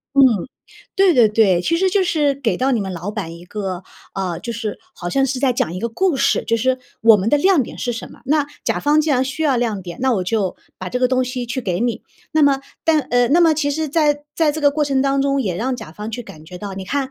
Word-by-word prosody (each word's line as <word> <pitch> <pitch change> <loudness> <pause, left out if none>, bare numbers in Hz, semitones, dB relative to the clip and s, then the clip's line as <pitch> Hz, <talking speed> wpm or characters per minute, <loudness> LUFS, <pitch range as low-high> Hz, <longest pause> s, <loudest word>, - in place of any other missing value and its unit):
嗯， 275 - +7 0.7
对 385 -2 +4
对 240 -6 +5
对。 205 -5 +3
其 335 - 0
实 380 +2 +2
就 385 0 +2
是 295 -5 +1
给 265 -4 -1
到 265 +2 +1
你 240 - +1
们 190 -2 -4
老 180 +3 -5
板 190 -6 -5
一 170 +1 -12
个， 190 -1 -5 0.3
呃， 185 -4 -3
就 235 - -5
是 220 -2 -4 0.2
好 175 - -6
像 270 +8 +2
是 260 -1 -3
在 265 -2 +3
讲 175 -8 -1
一 185 - -5
个 235 - -1
故 345 +7 0
事， - - +1
就 230 - +1
是 260 +3 +1 0.2
“我 225 -1 +7
们 200 +2 -1
的 295 - +4
亮 360 -2 +3
点 - - -8
是 245 - -2
什 225 - -7
么”？ - - -16
那 290 +1 +2 0.2
甲 - - 0
方 295 +1 +3
既 310 0 0
然 260 -1 +2
需 275 +5 -4
要 285 -5 +2
亮 225 -5 -1
点， 175 -1 -8
那 260 0 +2
我 190 - 0
就 195 -1 -1 0.2
把 185 - -5
这 250 - -2
个 250 - +3
东 255 0 +1
西 250 -1 -4
去 255 +2 -3
给 180 -5 -2
你。 240 -1 -1 0.3
那 315 - +2
么 275 -2 +4 0.2
但 320 -2 +4
呃， 245 -2 +1
那 320 +7 +4
么 330 -2 +5
其 290 -2 0
实 310 +1 -2
在 295 -1 +1
在 315 -3 +3
这 315 - -5
个 285 -1 +4
过 300 +1 0
程 270 -2 +1
当 275 0 +1
中 275 0 +1
也 185 -7 -2
让 255 +6 -1
甲 155 - -9
方 210 +6 -7
去 245 +2 -5
感 155 -7 -13
觉 180 +2 -10
到， 195 +1 -6
你 190 0 -6
看 270 +4 -2
250 Hz, 295 characters per minute, -19 LUFS, 210-285 Hz, 0.7 s, 嗯